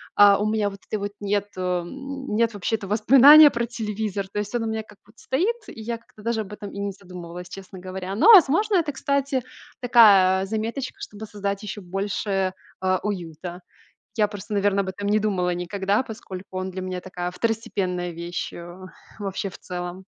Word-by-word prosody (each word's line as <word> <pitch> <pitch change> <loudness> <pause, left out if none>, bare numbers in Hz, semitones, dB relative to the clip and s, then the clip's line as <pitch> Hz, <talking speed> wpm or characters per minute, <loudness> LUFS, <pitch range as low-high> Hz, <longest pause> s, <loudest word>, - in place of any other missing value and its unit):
а, 205 -1 +7
у 210 - 0
меня 215 -1 +1
вот 200 0 -11
этой 215 - -2
вот 200 0 -3
нету, 205 -1 -2
м, 265 +9 -3
нет 230 +1 +2
вообще-то 205 +1 -2
воспоминания 270 +9 +8
про 235 -3 -2
телевизор. 210 -4 -3
То 205 - -3
есть 210 +1 -4
он 240 -1 0
у - - -2
меня 220 0 -2
как 210 -1 -18
будто 215 +3 -23
стоит, 370 - 0
и 225 - -9
я 230 +1 -3
как-то 225 -2 -19
даже 230 0 0
об 210 -1 -8
этом 210 -1 -7
и - - -10
не 200 0 -2
задумывалась, 180 -2 -10
честно 190 0 -10
говоря. 185 +1 -5
Но, 405 - +7
возможно, 395 +4 +6
это, 330 -5 +2
кстати, 280 -2 -1 0.4
такая, 200 -6 +6
а, - - -2
заметочка, 225 +6 -4
чтобы 210 +1 -8
создать 200 -1 -4
еще 210 0 -6
больше, 195 0 -2 0.3
а, 185 -1 +1
уюта. 175 -3 -5 0.6
Я 210 -1 +4
просто, 210 +1 -7
наверное, 200 -1 +2
об - - -8
этом 200 +2 -4
не 210 +1 +3
думала 190 -4 0
никогда, 190 +4 0
поскольку 200 -5 -8
он 185 0 -3
для 185 +1 -5
меня 185 -1 -4
такая 180 -1 -5
второстепенная 190 -4 -2
вещь, 170 +1 -5
э, 175 0 -9 0.4
вообще 195 -1 -3
в - - -12
целом. 180 +1 -6
205 Hz, 190 wpm, -24 LUFS, 185-225 Hz, 0.6 s, воспоминания